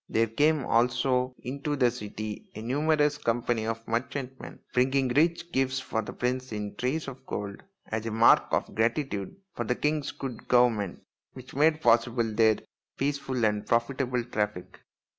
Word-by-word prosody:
There 115 +1 +3
came 145 +4 +2
also 125 +2 +2
into 140 +3 -3
the 125 -4 +3
city 105 -2 -6
a 110 - -6
numerous 150 +3 +2
company 115 -1 0
of 115 0 -4
merchantmen, 130 +3 -4 0.2
bringing 130 +1 +2
rich 165 +5 +2
gifts 130 -1 +1
for 110 -3 -2
the 105 - -7
prince 130 +1 -2
in 105 -1 -4
trays 135 +8 -1
of 130 -1 -8
gold 100 -1 -5 0.2
as 110 +1 -3
a - - -2
mark 115 +2 +6
of - - -1
gratitude 115 - -1 0.2
for 120 - -3
the 125 +2 0
king's 150 0 0
good 130 -4 -7
government, 115 -6 +2 0.3
which 130 0 -11
made 155 +3 +3
possible 120 0 +3
their 110 -1 +4 0.4
peaceful 135 -4 0
and 105 -1 0
profitable 125 +1 +1
traffic. 105 -6 -3
125 Hz, 155 wpm, -28 LUFS, 115-135 Hz, 0.4 s, mark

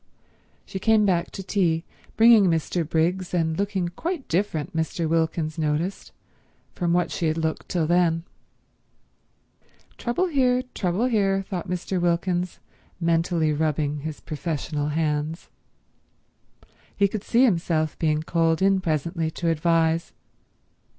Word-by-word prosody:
She 190 - -6
came 220 +1 +4
back 175 -3 +1
to 195 - -7
tea, 170 -5 +1 0.3
bringing 225 -2 +7
Mr. 165 0 0
Briggs, 175 +3 0
and 160 -2 +1
looking 195 -3 -1
quite 330 - -4
different, 170 -2 -1
Mr. 160 +1 -1
Wilkins 160 -1 0
noticed, 160 +5 -2 0.6
from 175 -2 -1
what 175 +1 +1
she 165 - -1
had 155 +1 0
looked 160 -1 -2
till 170 -3 0
then. 165 -1 +2 1.8
Trouble 240 +10 0
here, 255 -6 +2
trouble 185 +5 0
here, 195 -5 +1
thought 185 -2 -4
Mr. 180 0 -2
Wilkins, 175 +1 0 0.4
mentally 165 -2 +1
rubbing 150 -1 0
his 155 +1 -6
professional 150 -2 -3
hands. 155 +1 -2 1.5
He 200 - +4
could 205 0 -5
see 240 +2 +3
himself 165 - +1
being 155 -1 +1
called 165 -1 +1
in 195 -1 +3
presently 160 0 -1
to 165 +1 -2
advise. 165 0 +1
170 Hz, 125 wpm, -24 LUFS, 160-190 Hz, 1.8 s, bringing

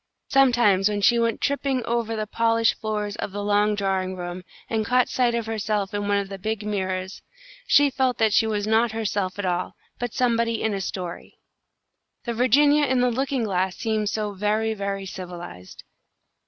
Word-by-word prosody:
Sometimes 240 -8 +4
when 205 -1 -2
she 235 +4 +4
went 230 -1 0
tipping 275 -3 0
over 230 -1 -1
the 215 -1 -2
polished 230 +1 +2
floors 210 -1 -2
of - - -4
the 205 +1 -4
long 205 +1 +2
drawing 190 -2 -1
room, 175 0 -6 0.3
and 220 -1 -1
caught 250 +3 +2
sight 245 -2 +1
of 230 -1 -2
herself 210 -3 -2
in 205 0 -2
one 205 0 +2
of 200 -1 -1
the 195 0 -8
big 215 +1 -3
mirrors, 190 -2 -3 0.5
she 285 -1 +5
felt 260 -1 0
that 220 -2 +2
she 225 - +4
was 210 -2 -1
not 220 +1 +2
herself 205 -4 -2
at 205 - -3
all, 180 0 -2 0.2
but 245 -1 -3
somebody 230 -2 +1
in 220 - 0
a 195 - -2
story. 180 -2 -6 0.9
The 235 - -3
Virginia 285 +5 +4
in 260 -1 +2
the 250 0 +2
looking 265 0 -1
glass 190 -3 -1
seemed 215 -2 -1
so 210 -1 -2
very, 210 +3 0
very 200 -1 -4
civilised. 175 - -9
215 Hz, 180 wpm, -24 LUFS, 195-235 Hz, 0.9 s, she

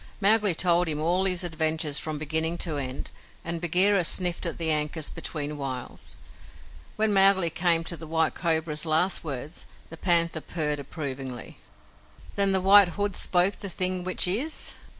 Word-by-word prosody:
Mowgli 205 -2 +3
told 175 0 +2
him 150 -2 -2
all 175 +4 0
his 180 -1 +1
adventures 160 -3 -1
from 155 -1 -4
beginning 160 +3 0
to 160 -4 -2
end, 130 -1 -5 0.3
and 165 0 -4
Bagheera 185 +3 +4
sniffed 175 +1 +1
at 170 - -5
the 165 -2 +2
ankus 150 0 -1
between 150 -1 -5
whiles. 130 -3 -5 0.8
When 215 -1 0
Mowgli 195 -3 +4
came 170 0 +1
to 170 - -5
the 160 0 -11
White 160 0 +1
Cobra's 160 -2 -1
last 160 +5 +1
words, 145 +1 -6 0.2
the 165 - -10
Panther 170 -2 +2
purred 150 -3 -3
approvingly. 135 -4 -7 0.7
"Then 200 -1 0
the 190 -1 +2
White 200 +1 +6
Hood 205 -2 -1
spoke 180 +2 +2
the 200 - -7
thing 185 0 +1
which 185 0 +1
is?" 250 - +1
170 Hz, 160 wpm, -25 LUFS, 155-185 Hz, 0.8 s, White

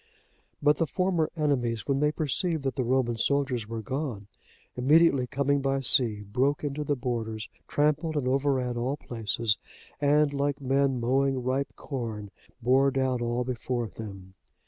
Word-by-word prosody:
But 150 +1 +4
the 165 - +1
former 180 -3 0
enemies, 125 -7 0
when 135 -1 +1
they 150 +1 +3
perceived 155 +1 0
that 135 - -1
the 130 - -1
Roman 120 -1 +1
soldiers 130 -3 0
were 115 0 -5
gone, 130 -5 -3 0.5
immediately 140 0 +4
coming 140 +2 +1
by 135 0 0
sea, 110 -3 +2
broke 130 +9 0
into 145 +1 -2
the 145 0 0
borders, 115 -3 -3 0.2
trampled 150 +2 +1
and 130 -3 -1
overran 130 -2 +1
all 130 +4 -1
places, 115 -4 -1 0.4
and 145 0 +3
like 140 0 -1
men 135 -1 +1
mowing 130 +2 +1
ripe 130 +2 -1
corn, 110 -7 -5 0.3
bore 135 +3 +4
down 130 -2 0
all 120 +1 0
before 120 -1 -3
them. 95 -4 -9
130 Hz, 150 wpm, -28 LUFS, 120-145 Hz, 0.5 s, But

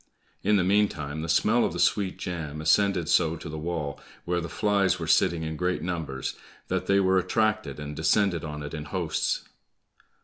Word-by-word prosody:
In 105 +2 +3
the 95 - +3
meantime 90 -7 +1
the 80 - -5
smell 110 +8 +3
of - - 0
the - - -4
sweet 100 -3 +1
jam 80 -4 -5
ascended 90 +2 +2
so 80 -1 +3
to - - -9
the 75 - -6
wall, 80 -3 -3 0.3
where 85 0 0
the 85 - -5
flies 100 -3 +2
were 85 - -4
sitting 80 0 +3
in 80 0 -3
great 90 -1 -1
numbers, 80 -7 -3 0.4
that - - -1
they 100 0 +4
were 95 -1 +3
attracted 110 -8 0
and 75 0 -6
descended 90 +2 +2
on 75 -2 -5
it 75 - -7
in 75 -2 -5
hosts. 75 - -1
85 Hz, 190 wpm, -27 LUFS, 75-95 Hz, 0.4 s, they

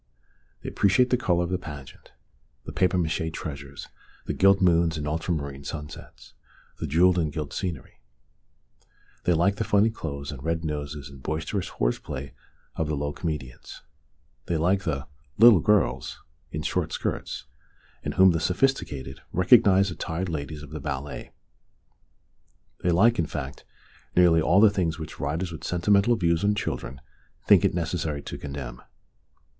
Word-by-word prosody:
They - - -4
appreciate 100 +6 +3
the - - +5
colour 90 -8 +1
of 85 - -4
the 90 - 0
pageant, 75 -6 -10 0.5
the - - -6
papier 90 0 +2
mache 80 -1 -1
treasures, 70 -3 -7 0.4
the - - -2
gilt 95 0 +5
moons 85 -3 +3
and 75 -1 -4
ultramarine 75 -3 -3
sunsets, 75 0 -9 0.5
the - - -3
jewelled 90 +5 +4
and 80 -3 0
gilt 75 -2 -5
scenery; 85 -3 -5 1.2
they 90 - +4
like 95 +5 +2
the 115 - 0
funny 105 +2 +3
clothes 70 -9 -6
and 70 -4 -8
red 80 +1 -1
noses 75 -2 -4
and 70 -2 -13
boisterous 80 +7 -3
horseplay 65 +2 -3 0.4
of 80 - -1
the 75 - -1
low 75 +1 -2
comedians; 75 -8 -6 0.6
they 85 - 0
like 95 +4 +1
the 70 -4 -2 0.2
" 75 -1 -38
little 115 -3 +8
girls 80 - +1 0.2
" - - -40
in 75 - -4
short - - -1
skirts, - - -3 0.6
in - - -3
whom 95 -1 +6
the 80 - 0
sophisticated 85 - -1
recognise 95 +1 +5
the 85 - -6
tired 90 +1 -3
ladies 75 -1 -5
of 75 - -11
the 75 - -5
ballet; 70 0 -5 1.5
they 90 - +1
like, 110 +7 +4
in 80 - +1
fact, 70 -3 -6 0.5
nearly 85 -2 +5
all 90 +4 +4
the 105 -1 +7
things 85 -6 -1
which 80 -1 -8
writers 80 +5 -2
with 80 - -8
sentimental 100 +6 +3
views 85 -4 +1
on 105 +1 +3
children 65 -9 -4 0.5
think - - +6
it - - +2
necessary 80 -4 -2
to - - -7
condemn. 70 -4 -7
80 Hz, 160 wpm, -26 LUFS, 75-95 Hz, 1.5 s, little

